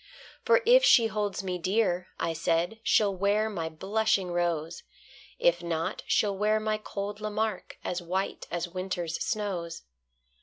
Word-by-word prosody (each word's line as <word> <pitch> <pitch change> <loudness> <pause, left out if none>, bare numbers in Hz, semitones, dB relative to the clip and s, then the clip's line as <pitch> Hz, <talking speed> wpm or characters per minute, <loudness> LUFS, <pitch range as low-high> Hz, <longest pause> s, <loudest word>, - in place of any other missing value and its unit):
For 475 0 +4
if - - +7
she 235 - +7
holds 205 -3 -2
me 180 -1 -3
dear, 185 -1 +1
I 165 - -1
said, 165 +6 0
She'll 205 -3 +3
wear 205 +3 +1
my 165 -5 -3
blushing 195 +2 0
rose; 170 -1 -1 0.6
If 175 0 +3
not, 170 +2 -2
she'll 205 -2 +2
wear 210 +2 +2
my 215 0 -1
cold 205 0 -5
Lamarque, 215 -1 -3
As 180 0 -2
white 185 +3 -3
as 175 0 -2
winter's 175 -2 -3
snows. 175 -5 -3
190 Hz, 145 wpm, -28 LUFS, 175-215 Hz, 0.6 s, if